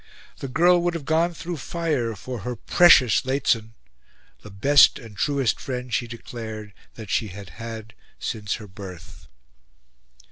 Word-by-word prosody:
The 135 Hz, -, -4 dB
girl 175 Hz, +6 st, +4 dB
would 175 Hz, 0 st, 0 dB
have 155 Hz, -5 st, -5 dB
gone 165 Hz, +3 st, +1 dB
through 175 Hz, +1 st, -5 dB
fire 145 Hz, -8 st, -2 dB
for 125 Hz, +4 st, -6 dB
her 125 Hz, +5 st, -4 dB
"PRECIOUS 130 Hz, -3 st, +5 dB
Lehzen," 115 Hz, -4 st, 0 dB, 0.7 s
the 105 Hz, -, -11 dB
"best 135 Hz, +9 st, +5 dB
and 115 Hz, -3 st, -12 dB
truest 135 Hz, +2 st, 0 dB
friend," 125 Hz, -2 st, -5 dB
she 120 Hz, -, 0 dB
declared, 110 Hz, -2 st, -8 dB, 0.2 s
that 110 Hz, -4 st, -8 dB
she 110 Hz, -, +1 dB
had 100 Hz, -1 st, -9 dB
had 115 Hz, -1 st, -7 dB, 0.2 s
since 105 Hz, -2 st, -3 dB
her 110 Hz, -, -10 dB
birth. 95 Hz, -4 st, -11 dB
115 Hz, 145 wpm, -24 LUFS, 105-140 Hz, 0.7 s, PRECIOUS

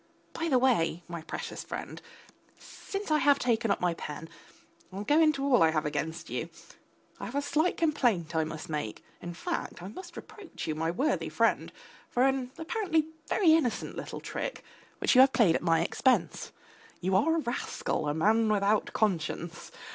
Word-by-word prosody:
By 330 Hz, 0 st, -2 dB
the 260 Hz, -, +4 dB
way, 175 Hz, -10 st, +2 dB
my 170 Hz, -1 st, -6 dB
precious -, -, -6 dB
friend -, -, -7 dB, 0.6 s
since 395 Hz, -4 st, -7 dB
I 305 Hz, -, +4 dB
have 285 Hz, 0 st, +5 dB
taken 230 Hz, -4 st, +1 dB
up 200 Hz, -, +2 dB
my 175 Hz, -1 st, +1 dB
pen 160 Hz, 0 st, -7 dB, 0.6 s
I'll 195 Hz, +2 st, -5 dB
go 295 Hz, +8 st, +3 dB
into 305 Hz, -4 st, +3 dB
all 275 Hz, -3 st, +4 dB
I 165 Hz, -, +6 dB
have 155 Hz, -1 st, 0 dB
against 150 Hz, +2 st, -3 dB
you -, -, -4 dB, 0.7 s
I -, -, -5 dB
have 245 Hz, -, -7 dB
a 285 Hz, -, +2 dB
slight 310 Hz, +5 st, +1 dB
complaint 235 Hz, -, +1 dB
I 160 Hz, -, +3 dB
must 160 Hz, 0 st, -6 dB
make; 150 Hz, -9 st, -4 dB, 0.2 s
in 175 Hz, -1 st, -6 dB
fact, 170 Hz, -, -4 dB
I 185 Hz, -, -6 dB
must 350 Hz, -, -10 dB
reproach 395 Hz, -5 st, -9 dB
you, 155 Hz, -, -1 dB
my 160 Hz, +1 st, -1 dB
worthy 265 Hz, -, 0 dB
friend, -, -, +1 dB, 0.4 s
for 245 Hz, -, +2 dB
an 265 Hz, -2 st, +1 dB
apparently 325 Hz, -3 st, 0 dB, 0.2 s
very 340 Hz, -6 st, +4 dB
innocent 305 Hz, -8 st, 0 dB
little -, -, -6 dB
trick -, -, -5 dB, 0.3 s
which -, -, +2 dB
you 255 Hz, -, +8 dB
have 265 Hz, 0 st, +6 dB
played 200 Hz, -9 st, +5 dB
at -, -, 0 dB
my 165 Hz, -2 st, +3 dB
expense.... 255 Hz, +9 st, +1 dB, 0.5 s
You 185 Hz, +1 st, 0 dB
are 320 Hz, +12 st, +3 dB
a -, -, +1 dB
rascal, 240 Hz, -, -2 dB
a -, -, 0 dB
man 220 Hz, +7 st, +3 dB
without 205 Hz, +1 st, +1 dB
conscience. 175 Hz, -4 st, -2 dB
225 Hz, 180 wpm, -29 LUFS, -, 0.7 s, you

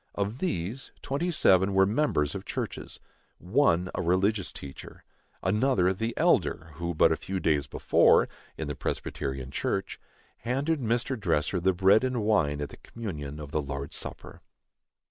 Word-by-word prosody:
Of 105 Hz, +5 st, -2 dB
these, 120 Hz, -, -3 dB
twenty 145 Hz, +6 st, -1 dB
seven 95 Hz, -, +3 dB
were 95 Hz, 0 st, +6 dB
members 100 Hz, -, +1 dB
of -, -, -5 dB
churches; -, -, -5 dB, 0.4 s
one, 90 Hz, -4 st, +2 dB
a -, -, -2 dB
religious 95 Hz, +3 st, +1 dB
teacher; 70 Hz, -1 st, -10 dB, 0.4 s
another, 95 Hz, -2 st, +2 dB
the 115 Hz, +5 st, -3 dB
Elder 80 Hz, +1 st, +2 dB
who 85 Hz, 0 st, -3 dB
but -, -, +5 dB
a -, -, +3 dB
few 95 Hz, 0 st, -4 dB
days 75 Hz, -5 st, +1 dB
before, -, -, +4 dB, 0.3 s
in 80 Hz, -, -4 dB
the 75 Hz, -, -2 dB
Presbyterian 65 Hz, -1 st, -4 dB
church, 95 Hz, -, -2 dB, 0.4 s
handed 140 Hz, +7 st, -1 dB
Mr. 120 Hz, +2 st, 0 dB
Dresser 90 Hz, -1 st, 0 dB
the 95 Hz, +2 st, +3 dB
bread 95 Hz, +6 st, +4 dB
and 125 Hz, -3 st, 0 dB
wine 80 Hz, -9 st, +2 dB
at 75 Hz, -, -3 dB
the -, -, -12 dB
communion 75 Hz, -10 st, -7 dB
of 75 Hz, -2 st, -8 dB
the 75 Hz, -, 0 dB
Lord's 70 Hz, 0 st, -5 dB
supper. -, -, -6 dB
95 Hz, 155 wpm, -28 LUFS, 75-115 Hz, 0.4 s, were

